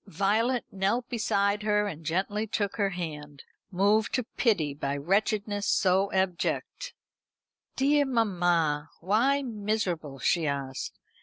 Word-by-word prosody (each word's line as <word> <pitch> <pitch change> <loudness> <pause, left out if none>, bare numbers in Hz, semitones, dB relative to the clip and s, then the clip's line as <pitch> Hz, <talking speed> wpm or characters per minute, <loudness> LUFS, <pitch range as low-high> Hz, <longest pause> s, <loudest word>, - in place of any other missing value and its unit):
Violet 215 +7 +1
knelt 200 +6 0
beside 205 -3 +1
her 210 0 +2
and 165 -5 -7
gently 195 +6 -1
took 205 -2 -2
her 200 -2 +2
hand, 150 -6 -6 0.3
moved 205 +4 +2
to 255 - 0
pity 200 - 0
by 140 0 -3
wretchedness 205 +5 0
so 190 +1 +2
abject. 190 - -2 0.8
"Dear 285 +2 +3
mamma, 175 - +1
why 240 +10 +2
miserable?" 205 - -2
she 160 +5 +1
asked. 140 -2 -4
200 Hz, 120 wpm, -28 LUFS, 165-220 Hz, 0.8 s, Dear